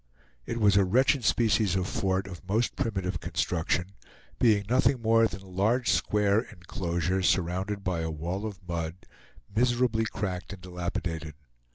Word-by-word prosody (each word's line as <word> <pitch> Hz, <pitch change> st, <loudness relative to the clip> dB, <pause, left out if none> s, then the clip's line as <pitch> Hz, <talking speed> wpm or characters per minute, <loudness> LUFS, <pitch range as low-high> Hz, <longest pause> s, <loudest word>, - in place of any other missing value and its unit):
It 115 Hz, -, -3 dB
was 100 Hz, -2 st, +4 dB
a 100 Hz, -, +6 dB
wretched 130 Hz, +7 st, +3 dB
species 110 Hz, -4 st, +2 dB
of 95 Hz, -1 st, 0 dB
fort 95 Hz, 0 st, -1 dB
of 90 Hz, -2 st, -9 dB
most 110 Hz, +4 st, +1 dB
primitive 95 Hz, -8 st, -2 dB
construction, 90 Hz, +1 st, -1 dB, 0.5 s
being 105 Hz, -4 st, +4 dB
nothing 125 Hz, +2 st, +3 dB
more 115 Hz, 0 st, +5 dB
than 95 Hz, -1 st, -9 dB
a -, -, -14 dB
large 110 Hz, +7 st, +1 dB
square 105 Hz, 0 st, +2 dB
inclosure, 90 Hz, -1 st, -3 dB
surrounded 95 Hz, +3 st, 0 dB
by 90 Hz, -3 st, -1 dB
a 80 Hz, 0 st, -2 dB
wall 85 Hz, +7 st, -3 dB
of 100 Hz, -3 st, -10 dB
mud, 85 Hz, 0 st, -4 dB, 0.5 s
miserably 120 Hz, -1 st, +2 dB
cracked 95 Hz, -3 st, -4 dB
and 95 Hz, -, -11 dB
dilapidated. 85 Hz, -3 st, -4 dB
95 Hz, 150 wpm, -28 LUFS, 90-110 Hz, 0.5 s, a